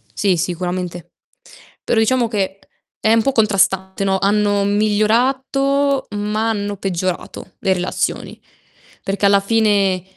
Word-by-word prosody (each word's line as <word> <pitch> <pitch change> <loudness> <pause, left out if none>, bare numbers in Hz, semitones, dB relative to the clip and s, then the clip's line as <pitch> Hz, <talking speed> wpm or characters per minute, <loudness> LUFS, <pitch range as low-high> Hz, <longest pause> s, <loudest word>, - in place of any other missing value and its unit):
Sì, 195 -3 +1
sicuramente. 175 0 -4 0.7
Però, 225 - +1
diciamo 235 +1 +2
che, 195 -3 -2 0.4
è 220 - +3
un 225 - +4
po' 275 - +1
contrastante, 195 -4 +1
no: 190 -1 +1
hanno 205 0 +1
migliorato 260 +7 +1
ma 210 +2 -1
hanno 205 -2 -3
peggiorato 185 -2 -4
le 195 - +1
relazioni. 180 0 -3 0.6
Perché 195 +1 -3
alla 200 0 +5
fine, 200 -3 +1
205 Hz, 120 wpm, -18 LUFS, 190-225 Hz, 0.7 s, alla